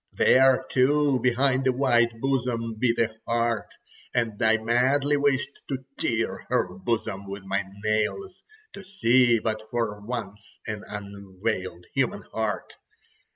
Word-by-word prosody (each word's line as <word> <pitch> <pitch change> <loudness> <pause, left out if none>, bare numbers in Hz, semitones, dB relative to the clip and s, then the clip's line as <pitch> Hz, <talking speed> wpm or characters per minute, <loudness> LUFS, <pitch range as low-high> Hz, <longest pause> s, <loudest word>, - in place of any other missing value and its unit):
There, 130 0 +5
too, 140 +1 +3
behind 130 +1 +2
a - - +5
white 120 -3 +2
bosom 125 -4 -1
beat 120 -1 +2
a 115 -1 0
heart, 115 -1 0 0.5
and 115 -2 -1
I 110 -1 +4
madly 130 +6 +2
wished 140 -1 +1 0.2
to 130 -2 -4
tear 115 -1 -2
her 90 - 0
bosom 100 0 -3
with 100 0 -6
my 100 +1 -1 0.2
nails, 110 - -1 0.3
to 200 - -9
see 125 -10 +3
but 110 0 -2
for 115 -3 -2
once 105 -3 -6
an 105 -1 -5
unveiled 100 -2 -5
human - - 0
heart. - - -3
115 Hz, 130 wpm, -26 LUFS, 105-130 Hz, 0.5 s, There